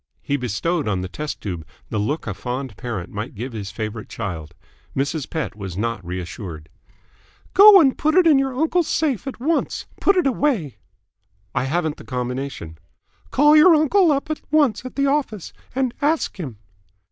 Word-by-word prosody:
He 140 - 0
bestowed 140 - -1
on 95 -3 0
the 95 - -4
test 150 +10 -6
tube 90 -6 -4 0.3
the 110 - -1
look 145 +10 -2
a 105 - -3
fond 125 +2 -5
parent 110 -8 -5
might 105 +5 -5
give 120 +4 -5
his 100 -3 -5
favourite 110 0 -5
child. 85 -9 -6 0.4
Mrs. 140 +2 -2
Pett 160 -8 -3
was 95 -4 -7
not 115 -2 -2
reassured. 85 -2 -6 0.8
"Go 400 0 +10
and 275 -6 +4
put 310 +1 +1
it 370 -1 +6
in 300 -4 +6
your 270 -1 -1
uncle's 325 +2 +2
safe 285 -6 0
at 270 - -6
once. 310 +6 -1
Put 390 -1 +3
it 360 - +3
away." 235 - 0 0.8
"I - - 0
haven't 160 +2 -1
the - - -11
combination." 125 - -5 0.5
"Call 295 +2 +5
your 320 +2 +8
uncle 320 +3 +4
up 280 +2 -1
at 310 - -3
once 290 -8 +2
at 255 - -7
the 280 - +1
office 275 - -1 0.2
and 260 -2 0
ask 295 -7 0
him." 130 - -6
150 Hz, 175 wpm, -22 LUFS, -, 0.8 s, Go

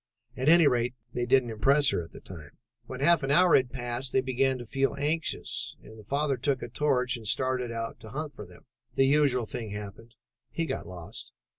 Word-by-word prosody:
At 130 +4 +1
any 170 0 +7
rate, 125 -2 +2 0.2
they 120 0 -2
didn't 130 -2 +3
impress 135 +6 +3
her - - 0
at 80 - -13
the - - -11
time. 80 -6 -11 0.3
"When 130 0 -7
half 170 +3 +5
an 135 - -2
hour 175 +5 +5
had 130 -2 +2
passed 120 0 -3
they 130 - +4
began 130 0 +1
to 120 - -8
feel 135 +4 0
anxious, 150 +3 -1
and 110 0 -13
the - - -12
father 140 +4 0
took 135 +1 -1
a - - -5
torch 125 -1 +1
and 110 -2 -9
started 130 +1 0
out 115 0 -5
to 110 - -11
hunt 150 +5 -5
for 105 - -9
them. 90 - -17 0.3
The 135 - +4
usual 135 -4 +3
thing 110 0 -6
happened; 105 +3 -8 0.3
he 165 - -2
got - - -4
lost. 90 -2 -9
130 Hz, 210 wpm, -28 LUFS, 115-140 Hz, 0.3 s, any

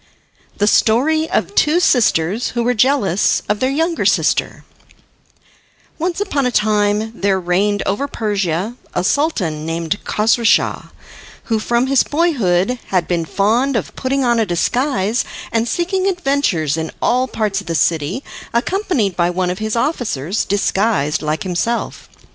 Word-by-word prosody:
The 205 - +2
Story 290 +10 +2
of - - -1
Two 320 -2 +3
Sisters 220 - +2
Who 235 - +1
Were 245 +1 +2
Jealous 235 -6 +2
of 210 0 0
Their 260 - +1
Younger 325 +4 0
Sister - - +1 1.3
Once 345 +3 -2
upon 290 -10 0
a - - -1
time 210 0 +1
there 195 -1 +2
reigned 195 +3 0
over 205 +9 -1
Persia 205 - -2 0.2
a - - 0
Sultan 185 - 0
named 165 +4 -3
Kosrouschah, 225 +2 +1 0.5
who 225 -2 -1
from 235 +3 +1
his 270 0 +3
boyhood 250 - +1
had 180 -3 0
been 170 -2 -1
fond 230 - +1
of - - -3
putting 270 +1 -1
on 240 -1 +2
a 225 - +2
disguise 230 - 0 0.3
and 230 0 0
seeking 370 - -1
adventures 275 - 0
in 160 0 -3
all 255 +2 +1
parts 215 -5 -2
of - - -16
the 165 - -2
city, 165 - 0 0.3
accompanied 255 - 0
by 175 0 +1
one 180 0 -1
of 180 - -5
his 215 +1 -2
officers, 220 - -1
disguised 195 -6 0
like 155 0 -2
himself. 195 +6 -3
220 Hz, 145 wpm, -18 LUFS, 185-270 Hz, 1.3 s, Two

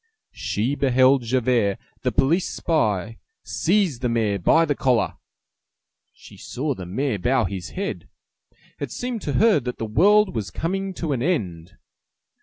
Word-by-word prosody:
She 115 +7 -2
beheld 130 -1 +3
Javert, 120 -4 +1 0.2
the - - 0
police 165 +7 +1
spy, 115 - -1 0.2
seize 160 - 0
the 125 -1 -1
mayor 110 -4 0
by 160 - +4
the 145 - 0
collar; 125 -4 0 0.9
she - - -16
saw 145 +3 -3
the 90 -7 -8
mayor 115 +3 -2
bow 125 +5 +2
his 95 -1 -5
head. 195 0 -4 0.7
It - - -5
seemed 245 -3 -4
to 145 - -3
her 215 - +4
that 125 -1 -5
the 115 - -3
world 205 - +4
was 105 -6 -3
coming 190 - -3
to 165 -3 -3
an 125 - -2
end. 100 - -2
130 Hz, 150 wpm, -23 LUFS, 110-165 Hz, 0.9 s, by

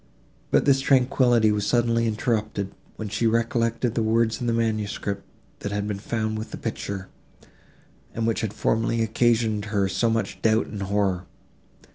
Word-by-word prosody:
But - - +3
this 135 -1 +5
tranquillity 125 -4 +4
was 105 -1 0
suddenly 115 -1 +2
interrupted, 105 -3 -1 0.2
when 110 - -5
she 110 +3 0
recollected 115 +1 +1
the 115 - 0
words 115 +1 +1
in 120 - -1
the - - +2
manuscript, 110 -3 -1 0.4
that 100 - -4
had 105 0 -2
been 100 -2 -3
found 110 0 -2
with 110 - -6
this - - -7
picture, 95 -1 -4 1.1
and 115 - -1
which 115 -1 0
had 110 - -2
formerly 115 +2 0
occasioned 110 -1 +1
her 100 -2 +1
so 115 +4 +1
much 115 -3 -2
doubt 110 0 +3
and 105 - -7
horror. 95 -2 0
110 Hz, 160 wpm, -25 LUFS, 105-115 Hz, 1.1 s, this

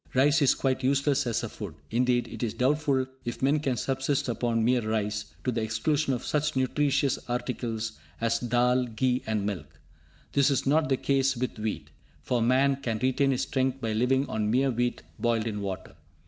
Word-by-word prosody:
Rice 145 +4 +4
is 140 - +5
quite 130 -1 0
useless 140 +1 +2
as 115 - 0
a - - -2
food. - - -7 0.2
Indeed, 120 +1 +2
it - - -8
is 115 -3 -2
doubtful 135 0 +2 0.2
if 120 +2 -5
men 145 +3 +3
can 135 -4 -1
subsist 135 +3 -1
upon 115 -1 0
mere 125 0 +3
rice, 105 -1 -1 0.2
to 130 - 0
the 115 -1 -1
exclusion 135 +7 0
of 120 - -6
such 150 -1 0
nutritious 140 +1 +1
articles 115 -2 -3 0.2
as 115 0 +1
dhall, 125 +1 +2
ghee 125 +2 +1
and 110 -2 0
milk. 80 -7 -5 0.5
This 140 0 +3
is 135 -3 0
not 150 +2 +3
the 135 - +2
case 135 -1 +1
with 125 -2 -3
wheat, 110 0 -4 0.3
for 125 -2 0
man 130 +3 +3
can 120 -5 -2
retain 130 +4 +2
his 130 -2 +1
strength 130 0 0
by 115 -3 -2
living 130 +5 +2
on 105 -1 -1
mere 130 +4 +2
wheat 120 0 -1 0.2
boiled 115 -2 +1
in 105 -3 -3
water. 95 -2 -5
125 Hz, 190 wpm, -28 LUFS, 115-135 Hz, 0.5 s, is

